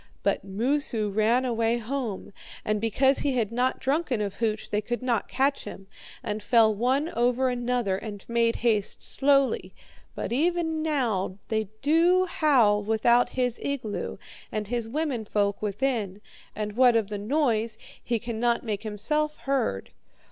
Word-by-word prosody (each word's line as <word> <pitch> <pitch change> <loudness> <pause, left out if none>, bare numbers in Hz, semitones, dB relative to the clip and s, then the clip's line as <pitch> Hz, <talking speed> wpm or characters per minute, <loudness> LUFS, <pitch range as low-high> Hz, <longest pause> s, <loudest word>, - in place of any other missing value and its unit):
But - - +1
Moosu 225 +2 -1
ran 225 +5 +2
away 230 -1 +1
home, 235 -4 -4 0.3
and 210 -1 0
because 265 +5 +3
he 280 - 0
had 225 -4 0
not 250 +2 0
drunken 275 -3 0
of 200 -2 -3
hooch 220 -2 -2
they 210 - +1
could 240 +4 -4
not 240 -4 0
catch 275 +2 0
him, 195 - -9 0.4
and 210 +1 -3
fell 220 0 +4
one 260 +8 +1
over 250 +1 +1
another 245 -5 0
and 205 -1 -8
made 235 0 +2
haste 210 -4 +1
slowly. 275 -1 +1 0.4
Even 320 +4 0
now 235 -12 -1
they 220 -2 -1
do 340 +5 +4
howl 265 - +3
without 225 +3 +3
his 250 -2 0
igloo, 255 -7 -3 0.3
and 210 -1 -3
his 235 -2 -2
woman 280 -4 -2
folk 205 -1 0
within, 210 -2 -1 0.4
and 210 -1 -3
what 250 -1 +5
of 220 -3 +1
the 205 -1 -4
noise, 230 -2 0 0.3
he 235 - 0
cannot 235 +1 -1
make 210 -4 -3
himself 300 +9 -1
heard.' 260 - -1
235 Hz, 150 wpm, -26 LUFS, 215-270 Hz, 0.4 s, what